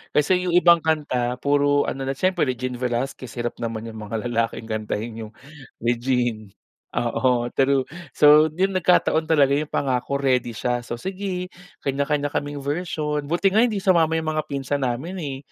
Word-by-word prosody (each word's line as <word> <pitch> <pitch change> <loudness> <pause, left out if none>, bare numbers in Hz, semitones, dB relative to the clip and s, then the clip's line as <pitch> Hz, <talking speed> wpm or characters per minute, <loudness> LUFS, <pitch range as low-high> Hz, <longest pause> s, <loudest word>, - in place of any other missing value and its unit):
Kasi 180 +5 +3
'yung 175 - +1
ibang 170 -1 +6
kanta 145 -6 0
puro 145 0 +3
ano 135 0 -4
na 135 - -1
siyempre 185 -3 +1
Regine 125 0 -3
Velasquez 125 +1 -3
hirap 120 -1 -3
naman 115 -1 -4
'yung 110 -1 -8
mga 110 +2 -5
lalaking 115 -1 -1
kantahin 110 +1 -3
'yung - - -17 0.5
Regine. 120 -3 -1 0.4
Oo 120 0 +1
true, 135 0 +2 0.3
so 150 +1 +7
'yun, 190 +3 +1
nagkataon 175 -3 +2
talaga 145 -4 +4
'yung 150 +2 0
Pangako 130 0 -1
ready 125 -3 +1
siya, 120 +2 -1
so, 120 0 -6
sige 185 +4 -4 0.3
kanya-kanya 145 +1 0
kaming 145 -1 -3
version 150 -1 -2
buti 175 +5 +2
nga 210 - +3
hindi 215 -5 -1
sumama 165 -4 +3
'yung 160 -1 -1
mga 155 0 -2
pinsan 140 0 -2
namin, 155 +11 -4
eh, 140 -5 -4
140 Hz, 160 wpm, -23 LUFS, 120-160 Hz, 0.5 s, so